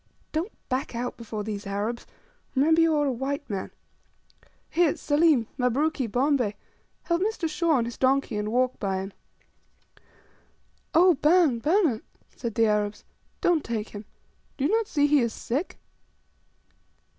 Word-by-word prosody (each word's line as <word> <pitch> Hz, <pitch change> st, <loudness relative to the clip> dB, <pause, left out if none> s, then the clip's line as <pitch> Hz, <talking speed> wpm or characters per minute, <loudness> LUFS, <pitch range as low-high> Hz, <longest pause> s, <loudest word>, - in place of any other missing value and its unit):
Don't 335 Hz, +8 st, -2 dB, 0.2 s
back 255 Hz, -1 st, -2 dB
out 245 Hz, +1 st, -3 dB
before 220 Hz, -2 st, -6 dB
these 205 Hz, -1 st, -5 dB
Arabs; 210 Hz, +4 st, -3 dB, 0.5 s
remember 320 Hz, +5 st, +4 dB
you 325 Hz, -1 st, +4 dB
are 295 Hz, -1 st, +2 dB
a 275 Hz, -, +1 dB
white 275 Hz, +3 st, -3 dB
man. 195 Hz, -5 st, -4 dB, 1.0 s
Here, 340 Hz, -2 st, +2 dB
Selim, 295 Hz, -5 st, +3 dB
Mabruki, 260 Hz, +2 st, +1 dB
Bombay, 250 Hz, -2 st, +1 dB, 0.5 s
help 340 Hz, 0 st, 0 dB
Mr. 405 Hz, -4 st, 0 dB
Shaw 320 Hz, +1 st, +1 dB
on 245 Hz, -5 st, +2 dB
his 235 Hz, -1 st, -7 dB
donkey, 265 Hz, -3 st, +2 dB
and 210 Hz, +1 st, -2 dB
walk 255 Hz, +1 st, +1 dB
by 195 Hz, -2 st, -1 dB
him." 190 Hz, +1 st, -5 dB, 1.8 s
"Oh, 360 Hz, +2 st, +7 dB
bana, 305 Hz, -3 st, +3 dB
bans," 310 Hz, -, +2 dB, 0.3 s
said 235 Hz, -4 st, -5 dB
the 230 Hz, -, +4 dB
Arabs, 210 Hz, -1 st, 0 dB, 0.4 s
"don't 340 Hz, -4 st, +2 dB
take 225 Hz, -2 st, -3 dB
him. 205 Hz, 0 st, -9 dB, 0.5 s
Do 270 Hz, -, 0 dB
you 300 Hz, -, +2 dB
not 450 Hz, -1 st, +2 dB
see 290 Hz, -1 st, +2 dB
he 290 Hz, 0 st, +4 dB
is 235 Hz, -3 st, 0 dB
sick?" 280 Hz, +10 st, -3 dB
265 Hz, 145 wpm, -26 LUFS, 225-315 Hz, 1.8 s, Oh